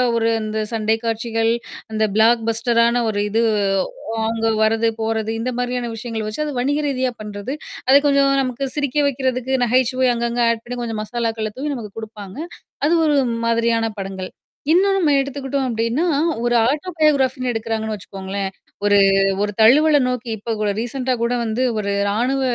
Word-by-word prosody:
ஒரு 230 Hz, 0 st, +2 dB
அந்த 215 Hz, 0 st, -3 dB
சண்டை 220 Hz, 0 st, +1 dB
காட்சிகள், 225 Hz, 0 st, 0 dB, 0.4 s
அந்த 220 Hz, 0 st, +1 dB
பிளாக் 230 Hz, +1 st, +4 dB
பஸ்டரான 235 Hz, +1 st, +2 dB
ஒரு 205 Hz, -1 st, -1 dB
இது 225 Hz, +3 st, +1 dB, 0.8 s
அவுங்க 225 Hz, 0 st, -1 dB, 0.2 s
வர்றது, 225 Hz, +1 st, +2 dB
போறது 220 Hz, 0 st, -1 dB
இந்த 250 Hz, +3 st, -2 dB
மாதிரியான 245 Hz, -1 st, -2 dB
விஷயங்கள் 225 Hz, -1 st, -4 dB
வச்சு 215 Hz, +8 st, -3 dB
அது 295 Hz, -, -4 dB
வணிக 285 Hz, +4 st, +1 dB
ரீதியா 260 Hz, -2 st, 0 dB
பண்றது. 210 Hz, +4 st, -5 dB, 0.3 s
அத 265 Hz, -, +6 dB
கொஞ்சம் 280 Hz, -1 st, +4 dB
நமக்கு 255 Hz, +1 st, -2 dB
சிரிக்க 285 Hz, -1 st, -1 dB
வைக்கிறதுக்கு, 260 Hz, -1 st, -1 dB
நகைச்சுவை 255 Hz, +2 st, +2 dB
அங்கங்க 235 Hz, 0 st, -1 dB
ஆட் 230 Hz, -1 st, 0 dB
பண்ணி 245 Hz, +1 st, -5 dB
கொஞ்சம் 225 Hz, -2 st, -3 dB
மசாலாக்கள்ள 225 Hz, -1 st, -2 dB
தூவி 290 Hz, +2 st, -2 dB
நமக்கு 220 Hz, -6 st, -6 dB
குடுப்பாங்க. 210 Hz, -3 st, -8 dB, 0.5 s
அது 320 Hz, -, +3 dB
ஒரு 295 Hz, -, +3 dB, 0.3 s
மாதிரியான 230 Hz, 0 st, +2 dB
படங்கள். 190 Hz, -1 st, -5 dB, 0.4 s
இன்னொன்னு 390 Hz, +3 st, +4 dB
நம்ம 310 Hz, -5 st, +3 dB
எடுத்துக்கிட்டோம் 275 Hz, 0 st, -2 dB
அப்பழடின்னா, 230 Hz, +7 st, 0 dB, 0.4 s
ஒரு 240 Hz, 0 st, +2 dB
ஆட்டோ 300 Hz, +6 st, -2 dB
பயோகிராபின்னு 265 Hz, -4 st, +2 dB
எடுக்குறாங்கன்னு 225 Hz, -1 st, -2 dB
வச்சுக்கோங்களேன். 195 Hz, 0 st, -5 dB, 0.4 s
ஒரு, 205 Hz, 0 st, +5 dB, 0.4 s
ஒரு 205 Hz, -, 0 dB
தழுவல 295 Hz, +7 st, +6 dB
நோக்கி 250 Hz, -1 st, -3 dB
இப்ப 225 Hz, +2 st, -4 dB
கூட 210 Hz, -, +1 dB
ரீசென்ட்டா 255 Hz, +2 st, -2 dB
கூட 235 Hz, +1 st, +1 dB
வந்து 225 Hz, +2 st, -2 dB, 0.2 s
ஒரு 200 Hz, -1 st, -1 dB, 0.2 s
ராணுவ 250 Hz, +6 st, 0 dB
235 Hz, 155 wpm, -20 LUFS, 220-260 Hz, 0.8 s, அத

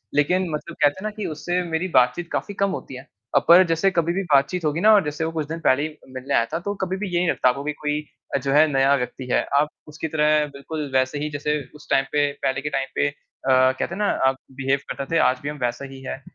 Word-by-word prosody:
लेकिन 180 Hz, +5 st, +2 dB
मतलब 160 Hz, +2 st, -5 dB
कहते 145 Hz, 0 st, +4 dB
हैं -, -, -9 dB
ना 215 Hz, -, -1 dB
कि 210 Hz, -, -3 dB
उससे 175 Hz, +4 st, -2 dB
मेरी 170 Hz, +2 st, -2 dB
बात-चीत 125 Hz, +8 st, +3 dB
काफ़ी 205 Hz, -, -3 dB
कम 200 Hz, 0 st, 0 dB
होती 135 Hz, -, -6 dB
है। 130 Hz, +3 st, -10 dB, 0.3 s
अब -, -, +3 dB
ऐ 185 Hz, +2 st, +9 dB
जैसे 165 Hz, +4 st, +2 dB
कभी 170 Hz, -1 st, +1 dB
भी 195 Hz, +1 st, -1 dB
बात-चीत 140 Hz, +5 st, +2 dB
होगी 150 Hz, +2 st, 0 dB
ना 215 Hz, +1 st, +7 dB
और 205 Hz, -2 st, +5 dB
जैसे 150 Hz, +1 st, -3 dB
वो 165 Hz, -, -2 dB
कुछ 155 Hz, -2 st, -3 dB
दिन 165 Hz, +2 st, -5 dB
पहले 140 Hz, -2 st, +2 dB
ही 155 Hz, 0 st, -5 dB, 0.2 s
मिलने 130 Hz, +2 st, -4 dB
आया 115 Hz, -, +3 dB
था 165 Hz, -, 0 dB
तो 205 Hz, -, -1 dB
कभी 190 Hz, 0 st, -1 dB
भी 210 Hz, +1 st, -3 dB
ये 175 Hz, -, +2 dB
नहीं 180 Hz, -, +1 dB
लगता 130 Hz, -, +3 dB
आपको 140 Hz, +3 st, -2 dB
कि 150 Hz, -, -1 dB
कोई 150 Hz, 0 st, -2 dB, 0.3 s
अ, -, -, +4 dB
जो 135 Hz, +1 st, -2 dB
है 155 Hz, +2 st, +6 dB
नया 135 Hz, 0 st, +4 dB
व्यक्ति 130 Hz, 0 st, -4 dB
है। -, -, +3 dB, 0.2 s
आप 150 Hz, +1 st, +1 dB, 0.2 s
उसकी 155 Hz, +2 st, -5 dB
तरह 150 Hz, -1 st, +2 dB
बिल्कुल 145 Hz, +1 st, -5 dB
वैसे 130 Hz, +2 st, +1 dB
ही 150 Hz, -, -2 dB
जैसे 150 Hz, +1 st, -1 dB, 0.2 s
उस 150 Hz, -, -15 dB
टाइम 135 Hz, -, +3 dB
पे 145 Hz, -1 st, +2 dB
पहले 135 Hz, +1 st, 0 dB
के 150 Hz, -, -3 dB
टाइम 135 Hz, -1 st, -1 dB
पे -, -, +2 dB
अ, 145 Hz, -, -2 dB, 0.4 s
कहते 130 Hz, 0 st, +4 dB
हैं -, -, -8 dB
ना 210 Hz, -1 st, +1 dB, 0.2 s
आप 135 Hz, -, +1 dB, 0.2 s
बिहेव 135 Hz, +1 st, +1 dB
करते 140 Hz, -, -4 dB
थे -, -, +5 dB
आज 130 Hz, 0 st, -2 dB
भी 145 Hz, -, -4 dB
हम 150 Hz, -, -6 dB
वैसा 120 Hz, +3 st, -2 dB
ही 135 Hz, 0 st, -10 dB
है। 130 Hz, -, -6 dB
150 Hz, 270 wpm, -23 LUFS, 135-165 Hz, 0.4 s, ऐ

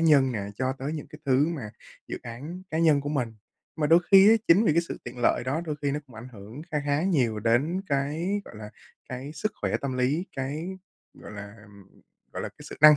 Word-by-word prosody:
nhân 140 Hz, -6 st, +5 dB
nè, 105 Hz, -, -2 dB, 0.2 s
cho 130 Hz, 0 st, 0 dB
tới 135 Hz, +3 st, -4 dB
những 150 Hz, -, -5 dB
cái 150 Hz, -, -12 dB
thứ 135 Hz, +2 st, +4 dB
mà 135 Hz, -11 st, -4 dB, 0.4 s
dự -, -, -4 dB
án 145 Hz, +10 st, -7 dB
cá 160 Hz, -, -1 dB
nhân 155 Hz, -4 st, +5 dB
của 145 Hz, -, -4 dB
mình. 125 Hz, -7 st, -1 dB, 0.4 s
Mà 150 Hz, -2 st, +1 dB
đôi 165 Hz, +3 st, +6 dB
khi 195 Hz, +1 st, +9 dB
á, -, -, +8 dB
chính 190 Hz, +7 st, +7 dB
vì 155 Hz, -, +4 dB
cái 170 Hz, -, +4 dB
sự -, -, -5 dB
tiện 120 Hz, 0 st, -8 dB
lợi 120 Hz, -, +2 dB
đó 135 Hz, +5 st, 0 dB
đôi 150 Hz, -2 st, -3 dB
khi 140 Hz, -, +1 dB
nó 145 Hz, -, -2 dB
cũng 125 Hz, -, -17 dB
ảnh 110 Hz, +2 st, -9 dB
ảnh -, -, -9 dB
hưởng 110 Hz, +7 st, -10 dB
kha 150 Hz, -, +2 dB
khá 145 Hz, +3 st, +2 dB
nhiều 125 Hz, -, +1 dB
đến 135 Hz, -, +2 dB
cái, 155 Hz, +8 st, 0 dB
gọi 110 Hz, -, -12 dB
là, 105 Hz, 0 st, -8 dB, 0.4 s
cái 130 Hz, +3 st, -6 dB
sức 195 Hz, +7 st, -2 dB
khỏe -, -, +1 dB
tâm 130 Hz, -2 st, -3 dB
lý, 145 Hz, +8 st, +1 dB
cái, 145 Hz, +6 st, -3 dB, 0.5 s
gọi -, -, -11 dB
là, 100 Hz, 0 st, -8 dB
ừm, 100 Hz, -2 st, -18 dB, 0.3 s
gọi -, -, -4 dB
là, -, -, -3 dB
cái -, -, -22 dB
sự -, -, -8 dB
năng 150 Hz, -1 st, +10 dB
140 Hz, 245 wpm, -27 LUFS, 120-160 Hz, 0.5 s, năng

